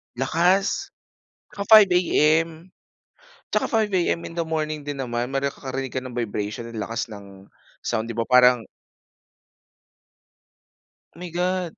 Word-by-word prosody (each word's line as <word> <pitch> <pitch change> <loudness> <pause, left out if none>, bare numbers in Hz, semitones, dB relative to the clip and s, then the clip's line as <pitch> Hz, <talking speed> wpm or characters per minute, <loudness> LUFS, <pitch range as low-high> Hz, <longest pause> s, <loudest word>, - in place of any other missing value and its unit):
Lakas! 175 - +1 0.6
Ah, 200 - -3
5 215 -2 +8
AM? 165 -1 +2 0.8
Tsaka - - +1
5 220 -2 0
AM 175 -2 0
in - - -7
the 170 - 0
morning 155 -2 -3
din 140 -2 -3
naman 120 -1 -2
may 135 +1 -2
ka 140 - 0
karinig 135 -1 -4
ka - - -2
ng 130 -1 -9
vibration 110 0 -4
lakas 115 +3 -4
ng 100 -2 -12 0.3
sound, 110 +1 -2
'di 115 - -6
ba? 115 - 0
Parang 125 0 +5 2.5
My 175 +1 -8
God! 180 0 -2
140 Hz, 135 wpm, -23 LUFS, 120-170 Hz, 2.5 s, 5